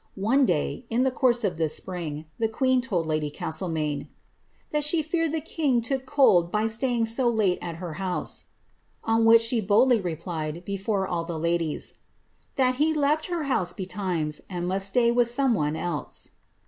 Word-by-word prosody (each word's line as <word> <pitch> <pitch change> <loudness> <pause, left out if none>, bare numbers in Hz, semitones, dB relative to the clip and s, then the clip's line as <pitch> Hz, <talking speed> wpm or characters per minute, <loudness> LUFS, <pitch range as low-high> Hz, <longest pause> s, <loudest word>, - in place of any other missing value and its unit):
One 245 +7 +3
day, 240 - -1
in 235 +3 +2
the 265 - +2
course 245 -2 +2
of 180 -5 -1
this 160 -2 +1
spring, 160 -5 -5
the 225 - +2
queen 255 +3 +1
told 190 -10 -1
lady 155 -1 -1
Castlemaine, 155 -2 -3
^^ - - -21 0.6
that 300 0 +1
she 310 +2 +1
feared 330 0 0
the 320 0 -2
king 290 -5 0
took 260 +2 -3
cold 185 - +4
by 210 +1 +1
staying 235 +1 0
so 240 +2 +1
lite 210 -6 +1
at 170 -1 -5
her 170 -1 -6
house,^' 185 -2 -3 0.6
on 225 0 +2
which 230 0 +7
she 230 0 +1
boldly 225 +4 +4
replied, 165 -1 -4
before 195 0 -1
all 170 -2 -2
the 165 -1 -5
ladies, 165 -1 -2 0.5
^ - - -42
that 255 -2 +2
he 310 +2 +2
left 300 +1 +1
her 345 -3 -2
house 190 -11 0
betimes, 180 -5 -3
and 175 -2 -3
must 195 +1 0
stay 235 +4 +3
with 240 0 +3
some 260 +1 +2
one 150 -6 0
else.'' 160 -3 -5
215 Hz, 185 wpm, -26 LUFS, 170-255 Hz, 0.6 s, which